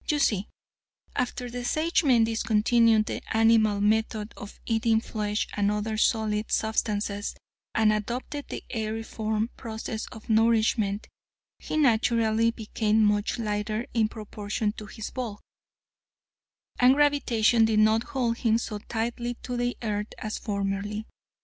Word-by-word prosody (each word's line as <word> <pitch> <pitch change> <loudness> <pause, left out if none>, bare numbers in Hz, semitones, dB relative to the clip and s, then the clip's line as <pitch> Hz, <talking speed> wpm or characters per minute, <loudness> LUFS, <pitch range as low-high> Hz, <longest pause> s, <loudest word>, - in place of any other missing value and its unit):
You 300 - +3
see, 210 -8 +1 0.7
after 250 0 -2
the 245 0 -5
Sagemen 295 -3 +3
discontinued 225 0 +3
the - - -4 0.2
animal 225 -2 +4
method 215 0 0
of 205 - -10
eating 225 0 +2
flesh 210 -2 -2
and 205 -1 +2
other 210 +1 -1
solid 215 -1 +1
substances 210 -2 -1 0.4
and 215 -1 +4
adopted 245 +7 -4
the - - -6
aeriform 220 0 -2
process 220 -1 -5
of 220 - -12
nourishment, 220 -2 +2 0.5
he - - -4
naturally 230 -4 +3
became 220 -1 0
much 210 +1 +1
lighter 215 0 -2
in 225 -2 +3
proportion 210 -1 -3
to 210 0 -10
his 220 0 -7
bulk, 235 -5 -5 1.4
and 250 +2 +6
gravitation 250 -6 +3
did 220 -1 +1
not 215 +1 +4
hold 240 -2 -1
him 225 -3 +2
so 215 -2 -4
tightly 235 +2 -3
to 250 - -4
the 245 0 -1
earth 210 -1 -1
as 215 0 -4
formerly. 200 +1 -3
220 Hz, 130 wpm, -27 LUFS, 210-235 Hz, 1.4 s, and